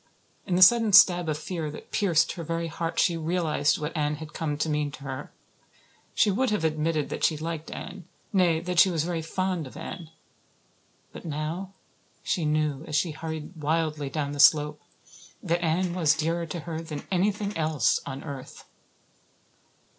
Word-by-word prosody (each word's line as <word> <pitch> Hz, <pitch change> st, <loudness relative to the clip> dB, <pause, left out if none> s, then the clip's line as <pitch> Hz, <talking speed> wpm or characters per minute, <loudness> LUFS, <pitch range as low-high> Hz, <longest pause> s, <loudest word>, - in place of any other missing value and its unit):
In 180 Hz, -, +1 dB
the 185 Hz, -, +7 dB
sudden 225 Hz, +1 st, +6 dB
stab 175 Hz, -4 st, +7 dB
of 150 Hz, -, -1 dB
fear 160 Hz, -1 st, -4 dB
that 150 Hz, -, -11 dB
pierced 170 Hz, -5 st, +2 dB
her 170 Hz, -, -6 dB
very 165 Hz, +1 st, -2 dB
heart 165 Hz, +1 st, -4 dB
she 170 Hz, -, +3 dB
realized 160 Hz, -3 st, +1 dB
what 150 Hz, +2 st, -5 dB
Anne 150 Hz, -1 st, 0 dB
had 155 Hz, 0 st, -9 dB
come 150 Hz, -3 st, -2 dB
to 150 Hz, -, -1 dB
mean 150 Hz, -1 st, 0 dB
to 140 Hz, -, -10 dB
her. 135 Hz, 0 st, -6 dB, 0.8 s
She 210 Hz, -, +4 dB
would 255 Hz, +6 st, +1 dB
have 210 Hz, -5 st, -1 dB
admitted 155 Hz, -1 st, 0 dB
that -, -, -5 dB
she 155 Hz, -, +3 dB
liked 160 Hz, 0 st, -5 dB
Anne 180 Hz, -2 st, -8 dB, 0.3 s
nay, 175 Hz, -4 st, +3 dB
that 180 Hz, -1 st, 0 dB
she 190 Hz, -, +7 dB
was 165 Hz, -4 st, 0 dB
very 170 Hz, -1 st, -2 dB
fond 180 Hz, -1 st, -2 dB
of -, -, -12 dB
Anne. 170 Hz, -5 st, -7 dB, 1.0 s
But -, -, -9 dB
now 165 Hz, +5 st, -4 dB, 0.5 s
she 170 Hz, -5 st, -1 dB
knew 150 Hz, -1 st, 0 dB
as 150 Hz, -, -3 dB
she 160 Hz, +2 st, +1 dB
hurried 160 Hz, +2 st, -6 dB
wildly 155 Hz, -2 st, 0 dB
down 145 Hz, 0 st, -2 dB
the 145 Hz, -, -6 dB
slope 150 Hz, +2 st, +5 dB, 0.6 s
that 170 Hz, +1 st, 0 dB
Anne 170 Hz, +2 st, +1 dB
was 160 Hz, -4 st, +3 dB
dearer 165 Hz, +2 st, -1 dB
to 165 Hz, +1 st, -5 dB
her 160 Hz, 0 st, -5 dB
than 155 Hz, -3 st, -7 dB
anything 200 Hz, +2 st, 0 dB
else 155 Hz, -6 st, +2 dB
on 135 Hz, 0 st, -6 dB
earth. 140 Hz, -4 st, -9 dB
160 Hz, 175 wpm, -27 LUFS, 150-175 Hz, 1.0 s, the